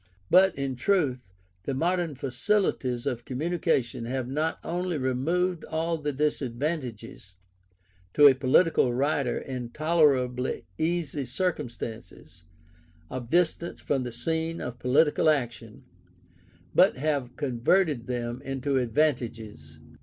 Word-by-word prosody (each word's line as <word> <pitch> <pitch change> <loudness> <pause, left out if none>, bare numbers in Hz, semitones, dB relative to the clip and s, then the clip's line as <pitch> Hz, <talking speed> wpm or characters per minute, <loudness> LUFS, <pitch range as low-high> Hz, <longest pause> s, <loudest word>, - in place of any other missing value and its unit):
But, 190 +1 +6
in 135 -1 -3
truth, 130 - 0 0.3
the 135 - -2
modern 170 0 0
facilities 130 - 0
of 120 -1 -2
communication 135 -4 -1
have 130 +1 -3
not 155 +5 -1
only 175 0 -2
removed 160 +7 0
all 165 +1 -2
the 150 -1 -2
disadvantages, 130 - -3 0.8
to 145 - +7
a 140 - +10
political 130 -1 +3
writer 140 -1 0
in 125 -3 -5
tolerably 135 - +1
easy 155 -4 -1
circumstances, 120 - -5 0.7
of 125 -2 -5
distance 170 +1 +1
from 140 -2 -1
the 125 -1 -4
scene 160 +6 -2
of 125 0 -6
political 150 +5 +3
action, 120 -3 -2 0.9
but - - +5
have 140 -3 -1
converted 140 +1 +1
them 120 0 -3
into 135 0 -1
advantages. 115 - -2
135 Hz, 110 wpm, -27 LUFS, 125-160 Hz, 0.9 s, a